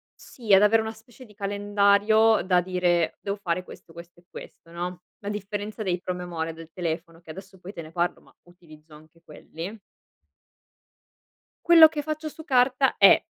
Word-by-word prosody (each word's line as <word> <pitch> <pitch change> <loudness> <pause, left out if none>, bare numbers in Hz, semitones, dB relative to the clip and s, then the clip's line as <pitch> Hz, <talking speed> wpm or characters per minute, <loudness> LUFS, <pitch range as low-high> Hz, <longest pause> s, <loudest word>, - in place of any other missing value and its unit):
sì 225 -6 -3
ad 195 - +7
avere 220 +2 +4
una 220 - -4
specie 225 +3 -16
di 210 - -19
calendario, 205 +2 +2
da 180 -1 +2
dire: 175 -2 0
devo 200 0 -4
fare 180 -2 -3
questo, 165 -2 -15
questo 170 +1 -13
e 175 - -27
questo, 165 - -13
no. 175 +1 -6 0.2
A 200 - -5
differenza 210 +1 -5
dei 180 -2 -2
promemoria 175 -3 -5
del 165 0 -13
telefono 165 -1 -5
che, 160 - -11
adesso, 190 +2 -12
poi, 185 +2 -10
te 170 - -7
ne 155 - -12
parlo 175 +1 -2
ma - - -24
utilizzo 160 -3 -19
anche 155 +2 -18
quelli. 165 +7 -9 1.9
Quello 330 -2 +9
che 300 -2 -4
faccio 310 +1 -5
su 315 +1 -10
carta 260 -1 +2
è - - +6
190 Hz, 170 wpm, -25 LUFS, 170-215 Hz, 1.9 s, Quello